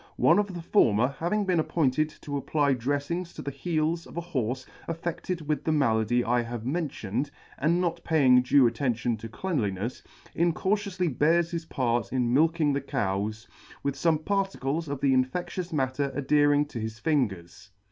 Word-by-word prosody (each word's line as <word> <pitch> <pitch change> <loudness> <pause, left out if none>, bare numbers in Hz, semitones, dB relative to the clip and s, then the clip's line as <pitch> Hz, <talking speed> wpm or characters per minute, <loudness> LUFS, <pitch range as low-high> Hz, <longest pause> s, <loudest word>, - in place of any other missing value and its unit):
One - - +5
of 200 -3 -2
the 170 - -6
former 125 - +3
having 200 +5 0
been 180 -3 +2
appointed 155 -2 +1
to 145 - -5
apply 140 0 +1
dreflinss 145 +8 -2
to - - -7
the 140 - -3
heels 160 +3 -1
of - - -12
a - - 0
Horfe 130 -6 -3 0.2
affe£led 170 +1 -3
with 150 0 -1
the 160 - 0
malady 120 -5 +2
I 120 +1 +2
have 120 -1 -6
mentioned, 135 - -2 0.3
and 165 +4 +2
not 175 -2 -1
paying 130 -6 +5
due 130 +1 +5
attention 120 0 0
to 115 +1 -8
cleanlinefs, 115 - -2 0.3
incautioufly 180 - 0
bears 165 +3 +3
his 170 -1 -3
part 120 -6 -1
in 125 -2 +1
milking 155 +1 +3
the 140 - -1
Cows, 110 -4 -2 0.4
with 140 - 0
fome 155 +2 0
particles 170 -6 -1
of 140 -1 -4
the 135 -2 +3
infe£!ious 175 +7 -1
matter 140 -1 -1
adhering 145 +1 +3
to 120 - -5
his 110 0 -5
fingers. 100 - -2
145 Hz, 165 wpm, -27 LUFS, 125-165 Hz, 0.4 s, One